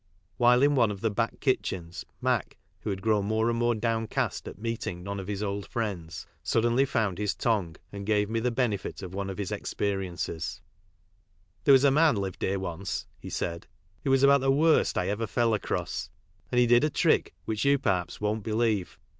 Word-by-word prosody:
While 125 +1 +5
in 145 0 +5
one 120 -5 +4
of 100 -2 -5
the 110 - +1
back 115 +3 -1
kitchens 90 - -1 0.2
Mac, - - 0 0.2
who - - -5
had 95 -1 -3
grown 105 -3 +2
more 110 +2 +1
and 115 - -1
more 120 0 +2
downcast 115 0 -1
at - - -8
meeting 105 -5 -4
none 100 +1 -4
of 95 - -7
his 105 0 -3
old 100 -2 -3
friends, 95 -8 -4 0.2
suddenly 120 +4 +2
found 105 -8 -1
histongueandgave 105 0 -1
me 115 +2 -1
the 125 +2 +1
benefit 115 -6 -2
of 95 -1 -7
one 100 0 -3
of 95 - -5
his 100 -3 -3
experi 95 -2 -2
ences: 85 -2 -4 1.1
There 140 - +7
was.a 135 +1 +6
man 150 -1 +4
lived 95 -3 -4
here 100 +1 0
once," 95 0 -4
he - - -8
said, 85 0 -3 0.4
who - - -1
was 135 0 +4
ahout 140 0 +7
the 135 0 +2
worst 155 +3 +3
I 90 - +1
ever 105 +3 -1
fell 115 +1 +1
across, 105 - -2 0.4
and 125 - 0
he 125 - +6
did 120 +2 +5
a 155 - +3
trick - - +2
which 110 -1 -2
you 140 0 +4
perhaps 90 -9 -1
won't 105 +1 -1
believe. 110 -3 0
110 Hz, 190 wpm, -28 LUFS, 95-120 Hz, 1.1 s, There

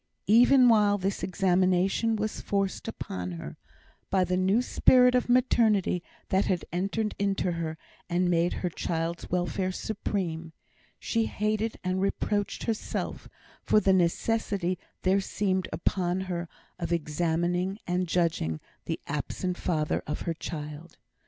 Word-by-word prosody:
Even 245 +4 +6
while 210 -3 +5
this 195 0 -2
examination 185 +4 +2
was 215 0 -3
forced 195 0 -1
upon 90 - -5
her, 85 - -7 0.5
by 190 -1 +3
the 180 0 0
new 190 +4 +3
spirit 250 0 +5
of 250 -1 +1
maternity 220 -7 +3 0.3
that 190 +1 +2
had 180 -3 0
entered 200 +4 -1
into 195 -2 0
her, 165 -2 -3 0.3
and 180 +1 +2
made 175 0 +2
her - - +1
child's 165 +1 -3
welfare 180 +1 -1
supreme, 170 -5 -3 0.4
she 225 -1 0
hated 215 +1 -1
and 185 +1 0
reproached 205 +1 -1
herself 225 -2 -3 0.3
for 215 - +4
the 195 -2 +3
necessity 185 0 +1 0.2
there 190 +2 +3
seemed 190 -2 -1
upon 180 +1 0
her 175 -3 -4 0.3
of 170 -1 -3
examining 175 +4 0
and 180 0 0
judging 160 - 0 0.3
the - - -3
absent 180 -1 -3
father 155 -4 -1
of 150 - -3
her 170 - -1
child. 155 0 -7
185 Hz, 135 wpm, -28 LUFS, 170-205 Hz, 0.5 s, Even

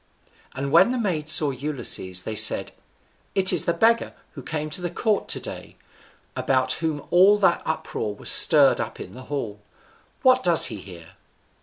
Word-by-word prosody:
And 135 +1 -5
when 180 +9 +4
the 255 - -3
maids 165 -9 -2
saw 150 -2 +4
Ulysses, 125 -10 -2
they 110 - -6
said, 105 - +3 0.6
"It 190 -1 +2
is 175 - +4
the - - +1
beggar 225 +7 0 0.2
who 140 - -11
came 155 +3 -5
to 180 - -5
the 175 - -4
court 210 +4 -2
to - - -1
day, - - -10 0.6
about 130 -1 -1
whom 155 -3 -4
all 190 +4 +4
that 190 -4 +1
uproar 110 -9 -5
was - - -4
stirred - - +5
up - - -7
in - - -10
the 130 +5 -13
hall: 115 -8 -5 0.6
what 255 0 +3
does 175 -3 +5
he - - -3
here?" 85 -4 -14
155 Hz, 175 wpm, -22 LUFS, 130-185 Hz, 0.6 s, stirred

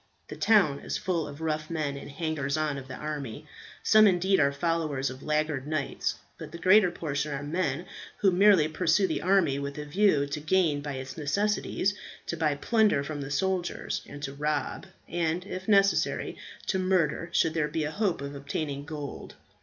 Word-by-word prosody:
The - - -6
town 185 -11 +4
is - - -3
full 170 -5 -1
of 145 +1 -9
rough 155 -1 -2
men, 155 -4 -2
the 140 - -8
hangers 145 -1 -2
on 150 -3 -1
of 135 - -11
the 130 - -7
army; 145 -7 -5 0.4
some, 215 0 +7
indeed, 190 +1 +3
are 140 -2 +4
followers 145 -3 -1
of 130 +1 -10
laggard 150 -2 -1
knights, 155 -2 -1 0.2
but 155 -2 -8
the 170 - -7
greater 185 +2 +5
portion 150 -3 -3
are 140 +1 -4
men 155 0 -1 0.3
who 195 - +3
merely 185 -3 +5
pursue 170 +4 +2
the - - -1
army 180 -7 +3
with 140 0 -5
a 150 - -5
view 150 -2 +3
to 145 +2 -4
gain 155 -2 +2
by 145 0 -4
its 130 +1 -7
necessities, 200 +5 0 0.3
to - - -3
buy 155 -3 +1
plunder 215 -2 +2
from 145 0 -5
the 135 - -5
soldiers, 180 +4 -1
and 145 0 -9
to 135 -1 -4
rob, 150 +5 -2 0.2
and, 170 +1 -1
if 185 -1 -6
necessary, 200 -2 +2 0.3
to 190 - 0
murder 175 -3 +1
should 165 -1 +2
there 155 -2 +1
be 155 +1 -2
a 150 - -2
hope 200 -5 0
of 140 0 -5
obtaining 140 0 -4
gold. 145 -3 -7
155 Hz, 185 wpm, -28 LUFS, 145-180 Hz, 0.4 s, some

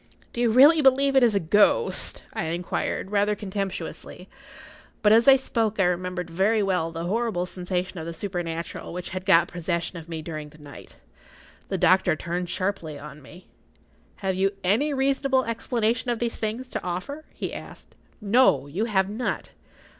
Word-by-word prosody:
"Do 240 - -3
you 240 - +3
really 285 +8 +7
believe 270 0 +4
it 265 - +6
is 235 -4 +4
a - - +3
ghost?" 205 - +2
I - - -3
inquired, 175 +3 -3
rather 205 0 +2
contemptuously. 190 -2 -5 0.8
But 210 - +5
as 230 +4 +5
I 270 - +10
spoke 230 -6 -1
I - - +5
remembered 180 0 -1
very 200 +6 +1
well 180 -4 0
the 165 0 -5
horrible 205 -1 -1
sensation 180 0 -4
of 160 - -6
the - - -4
supernatural[Pg 170 -2 -4
51] - - -9
which 180 0 -6
had 185 +1 -6
got 170 -3 +5
possession 170 0 -3
of 165 +1 -13
me 160 -2 -5
during 155 -2 -6
the 155 - -16
night. 145 -2 -13 0.7
The - - -1
doctor 185 -3 +3
turned 175 +3 -4
sharply 185 -6 -3
on 150 +1 -11
me—— 175 +7 -15 0.8
"Have 190 -1 0
you 195 +2 +1
any 220 +12 +2
reasonable 270 -1 +1
explanation 230 0 -1
of 240 - 0
these 235 0 -2
things 225 +4 -3
to - - -4
offer?" 185 - -5
he - - -5
asked. - - -11 0.2
"No; 210 - +3
you 175 +10 -2
have 190 -4 +1
not. 220 +5 -3
190 Hz, 175 wpm, -25 LUFS, 175-230 Hz, 0.8 s, I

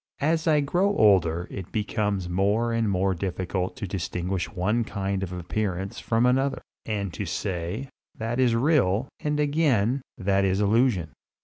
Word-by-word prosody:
As 160 +3 +1
I 150 -2 +4
grow 180 +8 +1
older 90 -5 +4
it 95 -2 -7
becomes 105 -3 -1
more 100 +6 +1
and 115 -2 +1
more 95 0 +1
difficult 95 0 -3
to 100 - -4
distinguish 90 0 -3
one 105 +5 0
kind 100 -2 -2
of 95 -2 -4
appearance 95 +1 -3
from 115 +1 +1
another, 135 +2 +1 0.2
and 100 -4 -2
to 100 - -4
say, 95 +8 -3 0.3
that 115 +3 -2
is 125 -3 +3
real, 125 - +2
and 150 0 -1
again, 140 -5 +2 0.2
that 100 +1 +1
is 95 0 +1
illusion. 105 - +2
105 Hz, 150 wpm, -26 LUFS, 95-125 Hz, 0.3 s, I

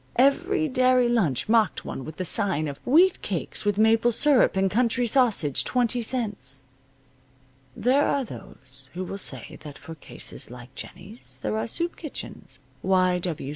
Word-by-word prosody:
Every 315 +7 +2
dairy 255 -2 +3
lunch 190 - 0
mocked 220 -4 +2
one 135 - -6
with 155 +3 -9
the 185 - -3
sign 175 -5 +2
of 140 -1 -7
"wheat 345 +8 +4
cakes - - -3
with 205 -1 +1
maple 225 +2 +4
syrup 265 +1 +4
and 190 - +2
country 240 +2 +1
sausage, 225 - +2
20 245 -1 +1
cents." 205 - -2 1.1
There 265 +5 +2
are 280 -2 0
those 130 - -11
who 185 - -3
will 195 +2 -6
say - - -6
that 150 -3 -10
for 165 - -10
cases 160 - -3
like 125 +1 -12
Jennie's 135 - -7
there 105 0 -1
are 110 +1 -2
soup 340 - -3
kitchens, 305 -4 -9 0.2
Y. 185 -1 +2
215 Hz, 155 wpm, -25 LUFS, 155-250 Hz, 1.1 s, wheat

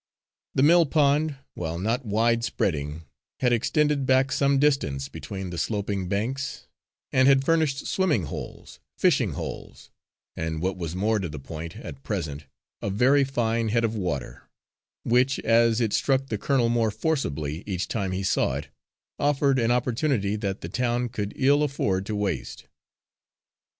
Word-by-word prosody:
The 130 - +3
mill 170 +2 +6
pond, 150 +1 +2 0.2
while 80 -1 -4
not 115 +8 -1
wide 115 +3 +2
spreading, 75 -8 -2 0.4
had 125 -2 +2
extended 145 +3 +1
back 130 +1 +3
some 140 0 +2
distance 135 - +1
between 95 -2 -6
the 85 - -4
sloping 100 -2 -2
banks, 130 +8 -2 0.5
and 130 0 +4
had 135 -1 +5
furnished 155 -4 +1
swimming 170 - +1
holes, 75 - -8 0.2
fishing - - +2
holes, - - -7 0.4
and 80 -1 -3
what 95 +3 -1
was 85 -2 -5
more 105 +3 +1
to 90 -4 -3
the 75 - -7
point 80 +4 -7
at 70 -1 -9
present, 70 0 -4 0.3
a - - -2
very 130 +8 +4
fine 115 -4 0
head 115 +2 +1
of 115 -1 0
water, 90 - -4 0.5
which, 125 +3 +3
as 115 0 +3
it 115 -4 0
struck 135 0 +1
the 110 - -1
colonel 130 -2 +2
more 115 -1 +2
forcibly 80 - -2
each 95 -2 -2
time 100 -4 -2
he 95 +1 -2
saw 95 - +1
it, - - -6 0.5
offered 140 -2 +2
an 115 -1 +1
opportunity 120 -3 +1
that 100 -2 -3
the 85 - -6
town 120 +3 0
could 105 -3 -4
ill 140 +2 +3
afford 100 -10 0
to 110 - -2
waste. 100 -8 -3
115 Hz, 155 wpm, -26 LUFS, 95-135 Hz, 0.5 s, mill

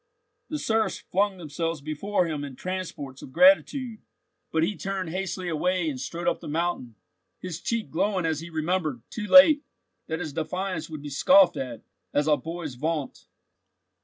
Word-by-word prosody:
The 305 - -2
serfs 220 -5 0
flung 195 +1 0
themselves 165 0 -3
before 155 +7 -1
him 155 -3 -3
in 140 -2 -7
transports 165 -7 -5
of - - -10
gratitude, 270 - +4 0.5
but 160 0 +2
he 205 +5 0
turned 185 +1 -3
hastily 185 0 -3
away 175 +2 0
and 130 - -6
strode 170 +6 -4
up - - +1
the - - -9
mountain, 155 -7 -2 0.4
his 180 -2 -6
cheek 230 -2 -2
glowing 185 +2 0
as 160 -2 0
he 165 +1 -8
remembered, 155 -6 -1
too 210 -2 -4
late, 285 +3 +8 0.5
that 160 0 -3
his 160 -5 -5
defiance 165 +1 -3
would 155 -2 -7
be 145 - -6
scoffed 180 +5 +6
at, 120 -4 -5 0.3
as 145 - +3
a 150 -1 +4
boy's 165 -2 -6
vaunt. 150 +2 -3
170 Hz, 165 wpm, -26 LUFS, 150-190 Hz, 0.5 s, late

